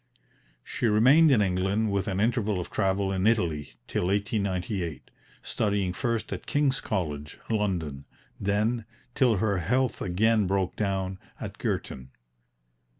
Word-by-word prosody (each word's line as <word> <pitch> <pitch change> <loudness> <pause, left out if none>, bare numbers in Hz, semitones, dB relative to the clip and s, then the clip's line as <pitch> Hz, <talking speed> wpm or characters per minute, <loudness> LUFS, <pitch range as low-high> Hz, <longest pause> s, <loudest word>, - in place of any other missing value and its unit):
She 120 - -2
remained 130 +10 +6
in 120 -7 +5
England, 95 +3 0
with 100 +1 -1
an 95 -2 -1
interval 110 -3 +1
of 90 - -6
travel 95 -1 +1
in 95 +1 +1
Italy, 85 -10 0
till 90 - -1
1898, 100 - -2 0.3
studying 100 -4 0
first 115 +2 -2
at - - -7
King's 145 -3 +1
College, 75 -8 -3
London, 85 -10 -1 0.3
then, 105 +3 0 0.3
till 125 -4 +3
her 100 -1 +1
health 125 +7 0
again 105 +3 +2
broke 95 -1 0
down, 95 -2 -2 0.2
at - - -7
Girton. 65 0 -3
100 Hz, 130 wpm, -27 LUFS, 90-110 Hz, 0.3 s, remained